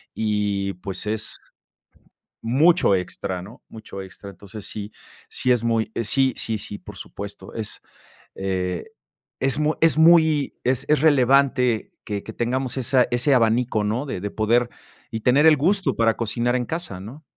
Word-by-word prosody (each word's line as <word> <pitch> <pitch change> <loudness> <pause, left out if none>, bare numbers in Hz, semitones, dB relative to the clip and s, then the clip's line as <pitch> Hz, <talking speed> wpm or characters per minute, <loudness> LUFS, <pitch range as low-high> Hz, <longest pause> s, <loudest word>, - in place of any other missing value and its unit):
y, 105 -2 -1
pues, 95 +2 -6
es 110 0 -2 1.0
mucho 135 - +4
extra, 90 0 -3
¿no?, 110 +7 -13
mucho 110 -3 -9
extra. 95 +1 -10
Entonces 100 +2 -8
sí, 105 0 -6 0.4
sí 125 - -1
es 120 -2 0
muy 115 -2 0
sí, 130 +4 +2
sí, 110 -1 -2
sí, 105 0 -7
por - - -12
supuesto. 100 -1 -9
Es, 110 -2 -5 0.6
eh, 90 -2 -2 0.5
es 135 +2 +1
mu 150 +1 +2
es 165 -1 +4
muy 160 -3 +4
es 130 +2 0
es 150 -2 +3
relevante 130 -5 +3
que 100 -2 -4
que 110 - -8
tengamos 130 +2 -2
esa 130 0 +3
ese 125 +3 +2
abanico, 115 -1 +2
¿no?, 115 +7 -1
de 95 - -4
de 105 - -4
poder 120 +3 +1 0.4
y 110 - -3
tener 140 +6 +4
el 155 -2 +7
gusto 190 +6 +1
para 115 -1 +2
cocinar 120 +2 0
en 125 -1 0
casa, 165 - -4
¿no? 125 +11 -10
115 Hz, 160 wpm, -23 LUFS, 105-135 Hz, 1.0 s, el